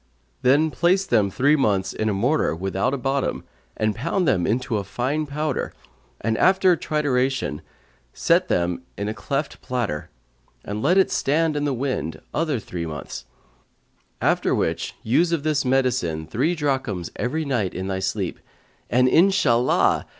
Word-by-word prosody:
Then 145 +5 +4
place 185 +4 +2
them 110 - +2
three 140 +9 +3
months 100 -9 +1
in 110 - -1
a - - 0
mortar 125 - +1
without 95 +7 -1
a 140 - -1
bottom 135 +2 -1 0.3
and 110 -1 0
pound 175 - -1
them 110 -1 +2
to 125 -4 -2
a 100 - -2
fine 130 +10 -2
powder 150 -1 -2 0.5
and 115 -1 0
after 190 -1 +5
trituration 130 - -1 0.5
set - - +2
them 85 0 0 0.2
in 100 - -3
a 105 - -2
cleft 140 +5 -3
platter, 115 -12 -3 0.6
and 105 +1 -4
let 175 +9 +3
it 190 - +4
stand 155 +2 +1
in 145 0 0
the 145 - +1
wind 120 - -3
other 155 -4 0
three 90 -6 -5
months; 75 -4 -7 0.9
after - - +2
which - - -2
use 165 +10 +2
of 165 -4 0
this 155 -2 +1
medicine 125 - 0
three 140 - 0
drachms 130 - -2
every 155 +6 -1
night 120 -9 -1
in 95 - -3
thy 95 0 -2
sleep, 95 -1 -2 0.5
and, 125 +3 +4
Inshallah! 150 -8 +3
130 Hz, 155 wpm, -23 LUFS, 100-150 Hz, 0.9 s, after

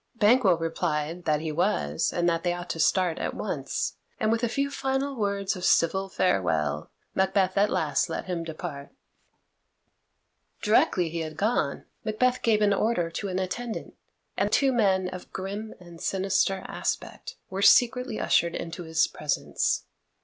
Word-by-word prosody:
Banquo 210 -4 +4
replied 165 0 -2
that 150 -1 +1
he 160 -1 -3
was, 80 - 0
and 175 0 0
that 165 -1 +1
they 175 -1 0
ought 175 0 -5
to 165 - -5
start 180 +1 +2
at - - -3
once, - - -3 0.2
and 215 - +2
with 230 +1 0
a 235 - +2
few 280 +3 -1
final 270 0 -1
words 200 -3 -1
of 180 - -7
civil 190 +4 +3
farewell 80 - 0 0.2
Macbeth 190 0 +2
at 205 +1 +3
last - - 0
let - - -3
him 175 -3 -3
depart. 155 -3 -6 1.7
Directly 190 -5 +3
he 165 +1 -4
had 155 -1 -5
gone, 200 -9 0 0.2
Macbeth 250 +4 +1
gave 215 -2 +3
an 205 -1 +4
order 195 -5 0
to 185 +4 -4
an 185 -1 -2
attendant, 220 +5 -4 0.4
and - - 0
two 275 -1 +4
men 190 -5 +2
of 185 0 -8
grim 200 +3 -5
and 175 -2 -13
sinister 195 0 +1
aspect - - -4 0.2
were 190 +1 -3
secretly 250 +1 +4
ushered 170 0 +2
into 170 +1 -5
his 160 -1 +2
presence. 150 -2 -1
185 Hz, 155 wpm, -27 LUFS, 165-215 Hz, 1.7 s, Banquo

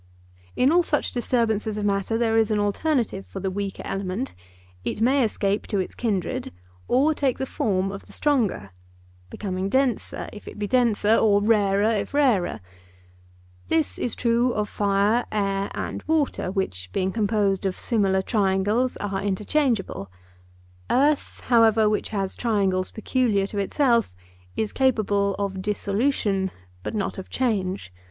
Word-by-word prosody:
In 260 +3 +4
all 350 +2 +5
such 305 -3 0
disturbances 220 -3 0
of 210 - -2
matter 200 +2 0
there 225 -1 +1
is 225 -1 +3
an 215 - +1
alternative 205 0 0
for 195 - -8
the 190 0 -2
weaker 200 0 -4
element: 185 - -3 0.5
it - - -3
may 260 +4 +3
escape 205 -2 -1
to 205 - -1
its 185 - -2
kindred, 205 -7 -2 0.4
or 280 +5 +3
take 275 -4 0
the 265 - -2
form 195 -6 -1
of 195 - -9
the - - -14
stronger—becoming 95 - -3
denser, 260 -1 0
if 210 - -11
it - - -9
be 210 - -2
denser, 225 -3 +3
or 205 -2 +4
rarer 205 0 +3
if 220 +5 -2
rarer. 235 - +2 1.1
This 320 -2 0
is 240 - -2
true 235 +1 +2
of 210 0 -1
fire, 205 +4 +2
air, 195 -1 0
and - - -4
water, 310 -11 0
which, 95 - -3
being 185 - 0
composed 205 -2 +1
of 185 - -3
similar 195 -5 +1
triangles, 205 +4 +1
are 195 -1 -3
interchangeable; 205 - -1 0.8
earth, 285 +3 +1
however, 225 -3 +4
which 210 0 0
has 195 -3 -2
triangles 195 -5 0
peculiar 220 -3 0
to 200 +1 -4
itself, 235 - +1 0.4
is 215 - -2
capable 205 -6 +1
of 195 -2 -3
dissolution, 205 -1 0 0.3
but 90 - -5
not 195 -2 -2
of 190 - -9
change. 195 - -1
205 Hz, 145 wpm, -24 LUFS, 195-235 Hz, 1.1 s, all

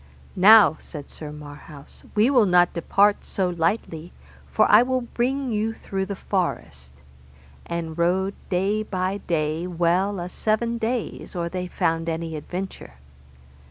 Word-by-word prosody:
Now, 205 -2 +7
said 150 -4 -9
Sir 150 -2 -8
Marhaus, 145 -1 -12
we 220 +6 +4
will 245 -7 +4
not 180 -1 +4
depart 200 +4 +2
so 185 -2 -1
lightly, 170 -1 -2 0.4
for 215 - +3
I 210 - +7
will 255 +1 0
bring 255 +2 -2
you 220 +1 -1
through 190 -2 -4
the 200 - -4
forest; 80 - -3 0.8
and 165 -2 -4
rode 185 +3 +1 0.2
day 195 +4 0
by 190 -1 -2
day 160 0 -2
well 180 +3 0
a 175 - -4
seven 225 +5 -1
days 230 -3 -3
or 170 -1 -2
they 180 0 -4
found 165 -1 -1
any 165 0 -4
adventure. 180 - -7
185 Hz, 140 wpm, -23 LUFS, 165-210 Hz, 0.8 s, Now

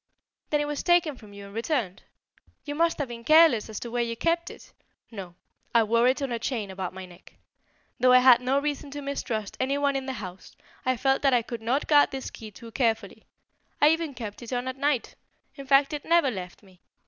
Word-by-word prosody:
"Then 295 - +1
it - - -1
was 295 -1 -3
taken 345 -4 +2
from 215 -4 -15
you 200 0 -10
and 200 - -12
returned? 230 - -2 0.6
You 290 - -4
must 335 +2 +1
have 285 - -2
been 235 -1 -8
careless 310 -6 +5
as 215 - -5
to 235 - -6
where 240 0 0
you 230 -1 -3
kept 340 +3 0
it - - -14 0.2
" - - -45
"No, 190 -5 -8 0.4
I 230 - +6
wore 230 +3 +3
it 265 +3 +1
on 270 - -3
a 235 - -2
chain 225 -5 -3
about 190 -1 -5
my 190 0 -7
neck. 175 -1 -17 0.6
Though 255 +1 +5
I 255 - +8
had 250 -1 +7
no 260 +2 +1
reason 290 0 -2
to 290 +1 -7
mistrust 225 -7 -4
any 275 +2 0
one 285 -1 +1
in 270 -1 -3
the 265 - -2
house, 185 -5 -9 0.3
I 255 -1 +2
felt 270 +2 +1
that 275 -3 +3
I 240 - +2
could 235 0 -7
not 250 +6 0
guard 295 -1 +5
this 270 -1 -6
key 220 - -10
too 230 +3 -12
carefully. 225 -2 -1 0.5
I 295 - +6
even 320 -3 -1
kept 225 -3 -7
it 235 - -9
on 245 0 -2
at 260 - -3
night. 280 -3 0 0.4
In 275 -2 -10
fact 275 +2 +4
it 295 - -4
never 335 -5 +3
left 185 -2 -8
me. 185 -2 -21
255 Hz, 230 wpm, -26 LUFS, 225-285 Hz, 0.6 s, I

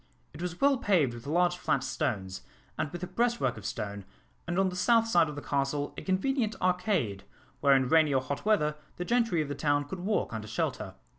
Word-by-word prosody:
It 150 - -9
was 175 -1 -4
well 275 -2 +4
paved 175 - +2
with 120 +2 -10
large 175 +3 +2
flat - - 0
stones, 95 - -2 0.3
and 150 - -2
with 175 +1 -6
a - - -2
breastwork 235 - 0
of 105 -2 -6
stone, 100 -1 -4 0.4
and 175 0 -2
on 195 -1 +3
the 180 - -6
south 230 +5 +4
side 170 -8 +3
of 150 - -7
the 145 - -7
castle 140 +1 -1
a - - -6
convenient 220 +4 0
arcade, 180 - 0 0.4
where 140 -1 +5
in 130 -1 +2
rainy 155 0 +4
or 135 -1 +2
hot 140 +2 -4
weather 150 -9 +2 0.2
the 180 - -4
gentry 230 -9 +2
of - - -7
the 145 - -3
town 145 0 +1
could 160 +6 -7
walk 200 - -1
under 110 -1 -5
shelter. 110 - -3
160 Hz, 215 wpm, -29 LUFS, 140-190 Hz, 0.4 s, where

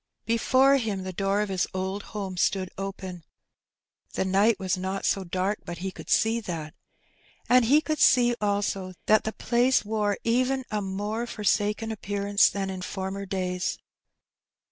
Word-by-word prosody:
Before 260 +4 +4
him 210 -6 -2
the 185 0 -5
door 195 +2 0
of 210 - -2
his 185 -2 0
old 190 +2 -2 0.2
home 195 -3 -4
stood 185 +1 0
open 190 -3 -6 0.4
— - - -40
the - - 0
night 200 +4 +3
was 185 -2 0
not 190 +1 -3
so 195 - +1
dark 185 +3 -1
but 175 - -6
he 190 +2 -4
could - - -11
see 225 +1 +3
that 165 -7 -5 0.4
— - - -33
and 250 -1 +5
he 290 +6 +5
cotdd 310 -1 -2
see 240 -1 +5
also 200 -2 -1
that 215 0 +4
the 220 - -1
place 245 +1 +2
wore 210 -1 0
even 255 +3 +1
a 210 -1 -1
more 205 +4 -3
forsaken 210 +1 0
appearance 200 -1 +2
than 195 -1 -3
in 185 -1 -6
former 190 +3 -4
days. 185 -1 -2
200 Hz, 165 wpm, -26 LUFS, 190-220 Hz, 0.4 s, and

